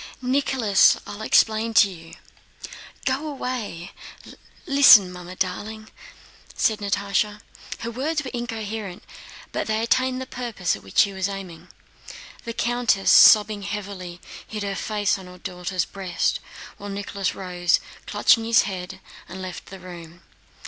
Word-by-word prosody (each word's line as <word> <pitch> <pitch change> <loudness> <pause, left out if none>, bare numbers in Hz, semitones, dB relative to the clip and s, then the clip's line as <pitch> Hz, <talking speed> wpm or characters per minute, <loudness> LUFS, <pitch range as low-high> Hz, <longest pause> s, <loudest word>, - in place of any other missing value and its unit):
"Nicholas, 250 -5 +3
I'll 205 - -8
explain 220 +1 +2
to 205 - +7
you. 165 -2 -12 0.9
Go 275 +3 -1
away! 245 - -5 0.7
Listen, 250 -9 +7
Mamma 180 0 -9
darling," 215 +4 -4 0.6
said 220 -2 +1
Natásha. 205 +1 -1 0.4
Her 230 - -4
words 300 +6 -2
were 255 - -6
incoherent, 220 -5 -5 0.5
but - - -3
they 220 0 0
attained 255 +3 +1
the 260 - -5
purpose 235 -9 -3
at 100 - -12
which 95 -1 -12
she 200 - +5
was 190 +1 -2
aiming. 180 -4 -8 0.8
The 230 - -4
countess, 235 -4 +1
sobbing 210 -1 +7
heavily, 195 -3 -6 0.3
hid 210 -1 -5
her 200 -1 -2
face 205 0 -1
on 185 - -11
her 180 0 -12
daughter's 180 0 -3
breast, 190 -3 -2 0.4
while 205 - -8
Nicholas 200 -1 -3
rose, 180 -2 0 0.3
clutching 225 - +3
his 230 0 +4
head, 190 -1 -6 0.3
and 185 +2 -8
left 185 -1 -7
the 195 - -10
room. 175 -1 -11
205 Hz, 135 wpm, -23 LUFS, 185-230 Hz, 0.9 s, to